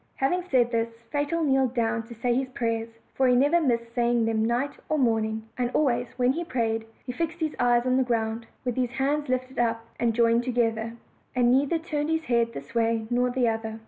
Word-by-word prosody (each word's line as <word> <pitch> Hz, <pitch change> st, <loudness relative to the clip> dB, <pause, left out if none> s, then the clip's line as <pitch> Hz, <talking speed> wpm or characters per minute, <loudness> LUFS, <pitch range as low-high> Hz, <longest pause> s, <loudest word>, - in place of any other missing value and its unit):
Having 355 Hz, +7 st, 0 dB
said 240 Hz, -3 st, +3 dB
this 230 Hz, -1 st, 0 dB, 0.2 s
Fatal 295 Hz, +3 st, 0 dB
kneeled 265 Hz, -3 st, +2 dB
down 230 Hz, -1 st, +1 dB
to 235 Hz, -, -10 dB
say 240 Hz, +2 st, 0 dB
his 260 Hz, +1 st, -1 dB
prayers, 230 Hz, -2 st, -2 dB, 0.2 s
for 265 Hz, -, +2 dB
he 250 Hz, -, +4 dB
never 290 Hz, +7 st, +4 dB
missed 235 Hz, -5 st, 0 dB
saying 240 Hz, -1 st, +2 dB
them 225 Hz, -1 st, +1 dB
night 245 Hz, +5 st, -1 dB
or 310 Hz, -, +1 dB
morning, 220 Hz, -4 st, +1 dB, 0.2 s
and 245 Hz, -1 st, +1 dB
always, 245 Hz, -4 st, +2 dB
when 250 Hz, 0 st, +3 dB
he 340 Hz, -, -3 dB
prayed, 225 Hz, -7 st, -1 dB, 0.2 s
he 255 Hz, -, -3 dB
fixed 330 Hz, +5 st, -3 dB
his 315 Hz, -2 st, -2 dB
eyes 240 Hz, 0 st, +3 dB
on 255 Hz, 0 st, +2 dB
the 260 Hz, -, +3 dB
ground, 225 Hz, -1 st, -2 dB, 0.2 s
with 245 Hz, -1 st, -2 dB
his 250 Hz, -1 st, 0 dB
hands 285 Hz, +2 st, 0 dB
lifted 255 Hz, 0 st, -2 dB
up 230 Hz, -1 st, 0 dB
and 230 Hz, -2 st, +1 dB
joined 230 Hz, 0 st, +4 dB
together, 230 Hz, -2 st, 0 dB, 0.4 s
and 245 Hz, -1 st, +4 dB
neither 280 Hz, +5 st, +3 dB
turned 310 Hz, -2 st, -3 dB
his 320 Hz, 0 st, 0 dB
head 235 Hz, -4 st, +1 dB
this 230 Hz, -, -9 dB
way 230 Hz, -1 st, +1 dB
nor 245 Hz, +1 st, +2 dB
the 245 Hz, -1 st, +1 dB
other. 225 Hz, 0 st, -2 dB
245 Hz, 210 wpm, -26 LUFS, 230-270 Hz, 0.4 s, he